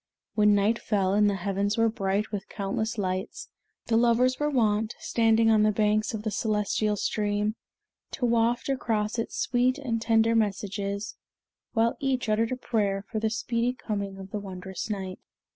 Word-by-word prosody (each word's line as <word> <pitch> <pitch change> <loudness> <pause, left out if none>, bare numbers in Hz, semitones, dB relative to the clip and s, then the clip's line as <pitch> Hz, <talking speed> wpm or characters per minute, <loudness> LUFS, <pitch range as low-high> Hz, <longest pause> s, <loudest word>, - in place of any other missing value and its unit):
When 210 -1 +4
night 210 +3 +2
fell 195 -3 0
and 205 0 +4
the 200 - 0
heavens 200 +2 -1
were 225 0 +4
bright 205 -2 -1
with 205 -1 -5
countless 220 +3 -3
lights, 190 - -3 0.4
the 225 - +2
lovers 240 +2 +3
were 295 0 +1
wont, 220 -4 +1
standing 225 -1 +3
on 215 -1 +4
the 215 0 +4
banks 215 +1 +1
of 210 - -5
the 215 - -2
celestial 210 0 0
stream, 210 +1 0 0.6
to 245 - -1
waft 235 +1 +2
across 225 -5 -1
it 230 - -2
sweet 255 +1 +1
and 235 -6 -2
tender 225 0 +3
messages, 200 -1 -2 0.6
while 230 0 +2
each 265 -3 -1
uttered 225 +2 +1
a 255 - -1
prayer 205 -5 -1
for 220 - -1
the 220 0 0
speedy 235 +2 -1
coming 200 -5 -4
of 190 0 -10
the 210 - -2
wondrous 190 0 -6
night. 190 -3 -4
215 Hz, 170 wpm, -27 LUFS, 200-230 Hz, 0.6 s, When